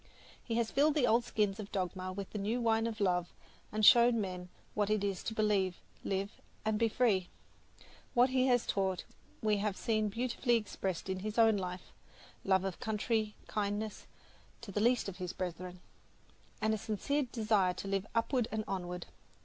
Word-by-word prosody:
He 230 - -3
has 230 -1 0
filled 295 +2 +3
the 285 -5 +4
old 235 0 +3
skins 210 -3 0
of 205 -1 -7
dogma 185 -1 -2
with 195 +1 -6
the 210 - -4
new 215 +5 0
wine 225 -1 +2
of 225 -1 -5
love, 180 -3 +1 0.4
and 215 0 +2
shown 235 0 +7
men 180 -3 -4 0.2
what 210 -1 0
it 215 -1 +1
is 195 -3 -1
to 220 - -4
believe, 200 -4 +2 0.3
live 195 +2 -3 0.2
and 215 -1 +1
be 230 - +4
free. 210 -6 +2 0.9
What 250 +2 +5
he 260 0 +3
has 245 -2 +3
taught 190 -2 0 0.4
we 210 -1 +3
have 205 -1 -1
seen 215 -2 +1
beautifully 240 +2 0
expressed 195 -5 -2
in 190 -1 -2
his 215 +3 -4
own 225 -2 +6
life 180 -2 -5 0.5
love 190 -1 +3
of 190 -2 -3
country, 220 -1 -1
kindness 210 +1 -3 0.5
to 225 -4 -8
the 205 - -1
least 240 0 +3
of 190 -2 -6
his 180 -2 -4
brethren, 180 0 -5 0.8
and 220 0 +2
a 215 - -1
sincere 255 +7 -1
desire 210 -5 +2
to 195 - -6
live 195 +1 -1
upward 235 +1 +1
and 220 0 -1
onward. 180 -2 -4
210 Hz, 180 wpm, -33 LUFS, 190-230 Hz, 0.9 s, shown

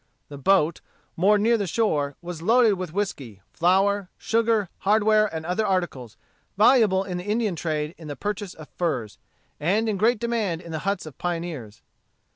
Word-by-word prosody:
The 145 - -8
boat, 170 0 +2 0.3
moored 205 +4 +3
near 230 +1 +3
the 200 - -1
shore, 150 -9 0
was 170 -2 -6
loaded 225 +3 +4
with 185 -4 -5
whiskey, 145 - -4
flour, 195 +2 +2
sugar, 225 -2 +1
hardware, 215 +1 +3
and 160 -4 -6
other 180 +6 0
articles, 175 - -2 0.4
valuable 210 -4 +5
in 180 -2 -4
the - - -6
Indian 210 -2 0
trade 155 -1 -2
in 160 - -10
the 145 - -5
purchase 205 +4 -4
of 155 -1 -11
furs, 130 - -3 0.4
and 200 +9 +1
in 210 -2 0
great 225 +5 +3
demand 220 -7 -1
in 170 -2 -10
the 160 - -3
huts 200 - -2
of 155 -4 -11
pioneers. 165 -11 -5
185 Hz, 170 wpm, -24 LUFS, 160-210 Hz, 0.4 s, valuable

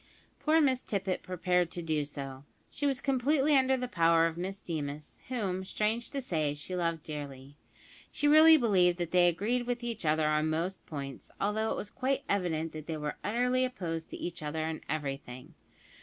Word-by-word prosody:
Poor 315 +1 +3
Miss 260 -4 +3
Tippet 195 -2 -2
prepared 180 -1 0
to 175 0 -5
do 155 -2 0
so. 135 -2 -7 0.3
She 290 - -1
was 270 -2 0
completely 280 +2 +2
under 265 0 +4
the 250 0 -3
power 165 -5 +4
of 165 -1 -1
Miss 190 +3 -4
Deemas, 150 -4 -5
whom, 195 -7 -2
strange 215 +4 -1
to 275 -2 -4
say, 155 - -1
she 150 +5 -5
loved 165 -3 -1
dearly. 140 -2 -7 0.6
She 290 - 0
really 315 +2 +8
believed 185 - +3
that 175 -2 -3
they 180 -1 +5
agreed 225 +8 0
with 245 0 -2
each 235 -4 -3
other 155 0 +2
on 155 +1 +2
most 170 +4 -2
points, 140 -3 -6
although 215 +2 0
it - - -1
was 205 - -5
quite 270 +1 -1
evident 165 -5 0
that 155 -1 -8
they 160 -2 -3
were 150 0 -4
utterly 250 +4 +1
opposed 170 -11 -3
to - - -7
each 175 -1 -5
other 155 +1 -2
in 160 0 -4
everything. 135 -4 -5
180 Hz, 185 wpm, -31 LUFS, 155-240 Hz, 0.6 s, really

